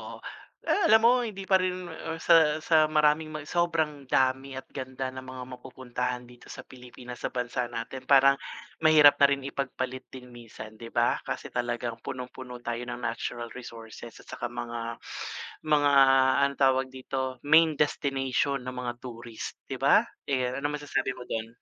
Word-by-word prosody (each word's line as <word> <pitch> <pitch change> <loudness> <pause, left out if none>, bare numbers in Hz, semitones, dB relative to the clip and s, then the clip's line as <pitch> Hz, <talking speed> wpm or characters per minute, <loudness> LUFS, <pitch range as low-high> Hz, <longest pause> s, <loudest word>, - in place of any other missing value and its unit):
oo, - - -11 0.5
eh, 405 - +1
alam 220 +1 +6
mo, 245 +2 +6
hindi 215 -5 -4
pa 190 0 +4
rin, 185 0 -2
ah, 160 0 -5
sa 160 -2 +4
sa 155 -2 +4
maraming 150 0 +3
ma 155 -1 -6
sobrang 160 -4 -1
dami 130 +1 +1
at 130 - -6
ganda 130 -1 -5
ng 130 - -7
mga 130 -1 -8
mapupuntahan 125 -1 -4
dito 120 0 -16
sa - - -9
Pilipinas, 125 -1 -11
sa - - -2
bansa 125 0 -2
natin. 120 +3 -7
Parang, 140 0 +6 0.4
mahirap 155 -2 +7
na 140 - +8
rin 140 -1 -1
ipagpalit 130 -1 -4
din 125 -1 -12
minsan, 110 -2 -11
'di 115 - -8
ba? - - +2
Kasi - - -5
talagang 120 -1 -3
punong-puno 125 -1 -8
tayo 120 +1 -4
ng 120 0 -6
natural 120 0 -4
resources 115 -2 -10
at - - -26
saka - - -4
mga 115 -1 -5 0.7
mga, 145 -2 +4 0.6
anong 140 0 -9
tawag 130 0 +3
dito, 130 0 -4
main 160 +1 +5
destination 140 -2 0
ng 130 0 -6
mga 120 -1 -3
tourist, 115 -2 -8
'di - - -4
ba? - - +5 0.2
Eh, 130 -2 -1
anong 145 +1 -2
masasabi 145 -2 -1
mo 125 - -10
do'n? 110 0 -3
130 Hz, 165 wpm, -28 LUFS, 125-150 Hz, 0.7 s, na